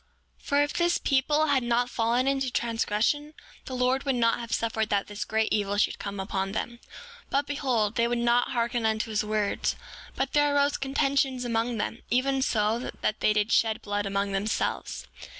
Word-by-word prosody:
7:25 - - -24
For 285 0 +3
if 290 - -3
this 345 0 +2
people 295 +3 +2
had 285 -3 +2
not 240 0 +1
fallen 240 +2 +1
into 270 -1 +1
transgression 235 +7 0 0.3
the 260 - -5
Lord 255 +1 +1
would 270 -2 0
not 230 -1 +2
have 235 -1 -7
suffered 220 -1 0
that 200 -1 +1
this 205 0 -5
great 220 0 0
evil 205 -1 0
should 210 - +1
come 200 0 -5
upon 195 0 -2
them. 235 +2 -4 0.5
But 280 +1 +1
behold, 250 -8 0
they 235 0 +3
would 240 0 0
not 240 +1 +2
hearken 235 -1 0
unto 220 0 0
his 215 0 +1
words; 210 -1 0 0.4
but - - -2
there 290 -1 +3
arose 285 0 +2
contentions 270 -1 0
among 230 0 0
them, 220 +2 -3
even 265 +2 +1
so 220 -2 +1
much 250 - -6
that 215 - 0
they - - +3
did 210 +1 +1
shed 220 -1 +2
blood 205 0 -2
among 200 0 -1
themselves. 195 +2 -2
235 Hz, 190 wpm, -27 LUFS, 215-270 Hz, 0.5 s, For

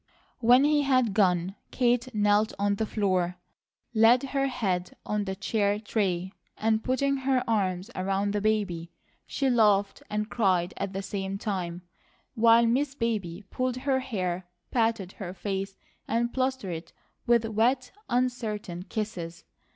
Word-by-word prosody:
When 245 +3 +6
he 295 0 +4
had 255 -6 +2
gone 185 -3 +2 0.2
Kate 245 0 +1
knelt 210 +1 +3
on 200 0 +1
the 220 - -1
floor, 185 -4 0 0.6
laid 230 +3 +5
her 275 0 0
head 185 -8 -2
on 210 -1 -1
the 190 -1 -3
chair 205 +1 0
tray, 190 -4 -1 0.2
and 220 0 +1
putting 275 +2 +1
her 265 -1 +1
arms 195 -2 0
around 195 +2 -1
the 205 - 0
baby 200 -6 0 0.4
she 275 - -1
laughed 210 -5 +3
and 210 0 -1
cried 185 -6 +1
at 200 0 -3
the 195 +1 -3
same 195 0 -3
time, 180 -4 -3 0.5
while 230 +1 +5
Miss 265 +4 +1
Baby 210 -7 -2
pulled 255 -1 -1
her 265 0 +1
hair, 185 -8 -3 0.2
patted 225 -6 +1
her 190 -3 -7
face, 195 0 -4 0.3
and 235 +1 0
plastered 260 -8 -1
it 165 +1 -8 0.3
with 235 -1 +4
wet, 240 +4 +1 0.2
uncertain 225 -7 -1
kisses. 180 -5 -5
210 Hz, 145 wpm, -28 LUFS, 190-240 Hz, 0.6 s, When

